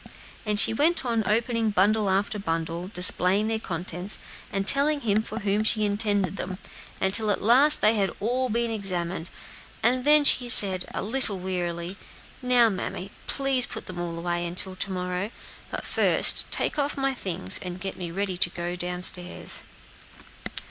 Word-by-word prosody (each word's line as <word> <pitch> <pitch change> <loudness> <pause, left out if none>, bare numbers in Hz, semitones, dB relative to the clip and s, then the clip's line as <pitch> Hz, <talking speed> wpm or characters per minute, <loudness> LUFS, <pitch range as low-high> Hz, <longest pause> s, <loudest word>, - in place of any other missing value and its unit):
And 210 -1 +1
she - - +4
went 310 +5 0
on 230 -2 -1
opening 230 +1 -1
bundle 205 +1 +1
after 200 +2 -2
bundle, 165 0 -5
displaying 185 +1 +4
their 225 0 -2
contents, 180 0 -3 0.3
and 195 0 -3
telling 285 +4 +5
him 215 -3 0
for 220 +1 -8
whom 205 +1 -1
she 215 -1 +2
intended 205 -2 -2
them, 185 0 -6 0.4
until 205 +3 +2
at 205 - -2
last 265 +7 +4
they 215 - +3
had 200 -3 0
all 250 +4 -2
been 235 +1 -2
examined, 180 -4 -4 0.5
and 250 +2 +1
then 300 +1 +4
she 250 -3 +4
said, 190 -5 +8
a - - -5
little 220 -2 -1
wearily, 180 0 -5 0.4
"Now, 250 -2 +3
mammy, 195 -1 -6 0.2
please 270 -3 +1
put - - -9
them 180 -1 -8
all 170 -1 -5
away 175 0 -3
until 185 +2 -6
to 195 +1 -4
morrow. 180 +2 -4 0.4
But - - -7
first - - +4
take - - +1
off 285 0 -2
my 270 0 -1
things 170 - -2
and 180 0 -7
get 195 +1 -6
me 175 -2 -7
ready 190 +1 -4
to 175 - +2
go 175 0 -6
downstairs." 180 0 0
200 Hz, 165 wpm, -24 LUFS, 180-230 Hz, 0.5 s, said